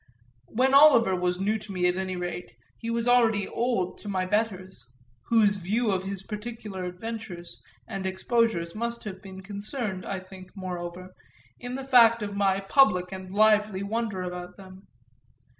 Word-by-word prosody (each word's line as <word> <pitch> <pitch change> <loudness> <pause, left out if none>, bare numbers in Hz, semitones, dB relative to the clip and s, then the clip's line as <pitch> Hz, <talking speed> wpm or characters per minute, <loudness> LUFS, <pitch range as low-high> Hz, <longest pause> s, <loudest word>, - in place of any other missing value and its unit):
When 260 +4 +1
Oliver 275 -9 +7
was 180 0 -1
new 210 +3 0
to 210 0 -10
me, 180 -2 +1
at 180 - +1
any 185 0 -3
rate, 180 -7 -5 0.3
he 230 - -5
was 230 0 -1
already 230 -5 +4
old 235 -7 -1
to 205 - -8
my 185 -2 0
betters; 185 - -2 0.3
whose 210 -3 +4
view 210 +5 0
of 190 -1 -1
his 195 -1 -5
particular 210 -3 -6
adventures 180 -1 -7 0.3
and 190 -1 -4
exposures 190 -3 0
must 235 +2 -4
have 190 -3 -7
been 190 -1 -10
concerned, 205 -1 -4
I 195 - -4
think, 185 +1 -13
moreover, 180 0 -6 0.5
in 245 +1 -5
the 270 0 -5
fact 235 -4 +6
of 205 -1 -4
my 195 -1 +2
public 195 -5 +3
and 190 -1 -7
lively 210 -1 +3
wonder 210 -2 -2
about 180 0 -7
them. 190 0 -14
195 Hz, 160 wpm, -27 LUFS, 185-225 Hz, 0.5 s, Oliver